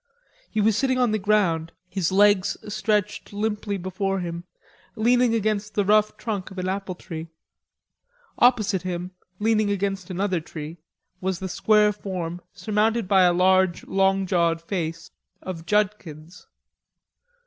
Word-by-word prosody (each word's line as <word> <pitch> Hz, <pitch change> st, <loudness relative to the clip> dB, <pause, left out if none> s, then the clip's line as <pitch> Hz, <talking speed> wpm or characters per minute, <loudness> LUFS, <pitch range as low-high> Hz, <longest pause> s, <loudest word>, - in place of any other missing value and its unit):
He 215 Hz, -, -2 dB
was 215 Hz, 0 st, +3 dB
sitting 260 Hz, +2 st, +1 dB
on 250 Hz, -3 st, +2 dB
the 215 Hz, -, 0 dB
ground, 185 Hz, -6 st, +1 dB
his 185 Hz, -1 st, -1 dB
legs 200 Hz, -1 st, +4 dB
stretched 210 Hz, 0 st, -1 dB
limply 210 Hz, -1 st, -2 dB
before 190 Hz, +1 st, -2 dB
him, 170 Hz, -1 st, -5 dB, 0.5 s
leaning 240 Hz, +1 st, +3 dB
against 215 Hz, -1 st, -1 dB
the 205 Hz, -, +2 dB
rough 215 Hz, +1 st, +3 dB
trunk 205 Hz, -5 st, -4 dB
of 190 Hz, -, -12 dB
an 185 Hz, 0 st, -2 dB
apple 190 Hz, -1 st, -3 dB
tree. 165 Hz, -2 st, -7 dB, 1.1 s
Opposite 215 Hz, -6 st, +3 dB
him, 180 Hz, 0 st, -4 dB, 0.3 s
leaning 215 Hz, 0 st, +2 dB
against 195 Hz, -2 st, -2 dB
another 185 Hz, 0 st, -1 dB
tree, 160 Hz, 0 st, -8 dB, 0.4 s
was 190 Hz, -1 st, -2 dB
the 190 Hz, -, -5 dB
square 210 Hz, +3 st, +3 dB
form, 180 Hz, -4 st, -5 dB
surmounted 220 Hz, 0 st, 0 dB
by 190 Hz, -1 st, +5 dB
a 180 Hz, -1 st, +5 dB
large 185 Hz, 0 st, +3 dB
long 195 Hz, 0 st, +2 dB
jawed 170 Hz, -3 st, +1 dB
face, 165 Hz, -2 st, -4 dB, 0.3 s
of 165 Hz, -3 st, -7 dB
Judkins. 180 Hz, -5 st, -2 dB
195 Hz, 135 wpm, -24 LUFS, 180-210 Hz, 1.1 s, by